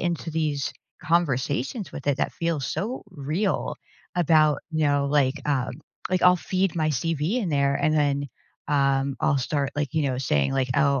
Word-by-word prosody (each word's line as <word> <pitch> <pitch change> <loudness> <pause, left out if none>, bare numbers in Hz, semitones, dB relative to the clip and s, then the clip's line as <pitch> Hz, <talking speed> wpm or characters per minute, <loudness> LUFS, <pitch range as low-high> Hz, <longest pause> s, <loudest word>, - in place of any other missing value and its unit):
into 170 -1 -2
these 150 -3 -1 0.3
conversations 155 - 0
with 145 -4 -8
it 140 - +2
that - - -1
feel 165 -2 -1
so 210 - -3
real 165 +7 -1 0.4
about, 155 -4 +4
you 155 - 0
know, 145 -1 +2
like, 140 -1 +2
um, 135 -3 +1 0.4
like, 185 -1 +1
I'll 180 0 +7
feed 185 0 -1
my 155 -2 +1
CV 165 - 0
in 210 -7 -1
there, 140 -2 +2
and 155 - +1
then, 145 -2 +1 0.4
um, 140 -1 +1
I'll 145 -3 +2
start 140 +1 -1
like, 145 0 -2
you 160 - +2
know, 130 -3 -1
saying 75 - +1
like, 135 -1 0
"Oh, 140 -1 +3
145 Hz, 175 wpm, -25 LUFS, 140-165 Hz, 0.4 s, I'll